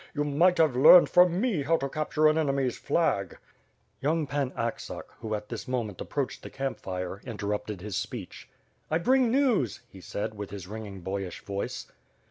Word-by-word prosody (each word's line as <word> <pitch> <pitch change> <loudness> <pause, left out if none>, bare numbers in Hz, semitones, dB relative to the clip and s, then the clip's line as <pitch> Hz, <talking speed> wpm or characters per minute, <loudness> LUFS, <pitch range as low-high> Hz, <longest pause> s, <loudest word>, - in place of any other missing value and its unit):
You 145 - +1
might 165 +5 +3
have 155 -6 +3
learned 170 +7 +8
from 180 0 +5
me 215 - +1
haw 165 +4 +2
to 140 - -2
capture 155 +2 +1
an 155 - +4
enemy's 135 -5 0
flag." 140 - 0 0.6
Young 155 +2 +1
Pan 140 -1 -1
Aksak, 115 0 -3 0.2
who 110 -1 -3
at 105 0 -7
this 115 - -6
moment 115 -7 -3
approached 140 -3 -3
the - - -8
camp 135 -1 -4
fire, 90 +1 -5
interrupted 105 -3 -4
his 105 -1 -4
speech. - - -6 0.4
'*I 155 - +2
bring 255 +7 +3
news," 240 - +2
he 95 - -14
said, 105 +4 -4
with 105 -2 -7
his 100 -2 -7
ringing 105 -2 -7
boyish 95 0 -5
voice. 100 0 -4
130 Hz, 175 wpm, -28 LUFS, 105-155 Hz, 0.6 s, learned